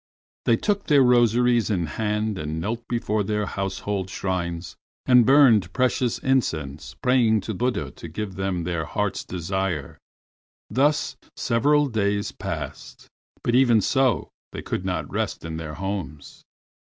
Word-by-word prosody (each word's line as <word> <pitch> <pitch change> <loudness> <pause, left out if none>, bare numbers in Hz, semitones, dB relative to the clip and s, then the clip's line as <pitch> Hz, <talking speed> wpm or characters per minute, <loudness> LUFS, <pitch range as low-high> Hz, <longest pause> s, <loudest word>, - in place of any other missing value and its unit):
They 115 - +4
took 200 - -1
their 145 -3 +6
rosaries 120 -1 +3
in 90 -5 0
hand 105 +4 -2
and 75 +1 -3
knelt 115 +7 -4
before 110 -3 -1
their 105 +1 -1
household 95 0 -3
shrines, 90 -2 -3 0.3
and 125 -3 +6
burned 120 -10 +5
precious 130 -2 +1
incense, 80 - -1
praying 120 -4 +3
to 110 - -4
Buddha 125 +5 -1
to - - -10
give 100 +4 -5
them 95 -2 -2
their 85 -2 -2
heart's - - -2
desire. 90 -4 -3 0.7
Thus 145 +3 +1 0.2
several 145 +1 +2
days 105 -5 -1
passed, - - -7 0.3
but 120 - 0
even 120 -3 +5
so 130 +1 +1 0.2
they - - -6
could 95 - -3
not 80 -5 -2
rest - - -2
in 80 -1 -5
their 80 -2 -6
homes. 90 -6 -5
105 Hz, 140 wpm, -24 LUFS, 90-125 Hz, 0.7 s, their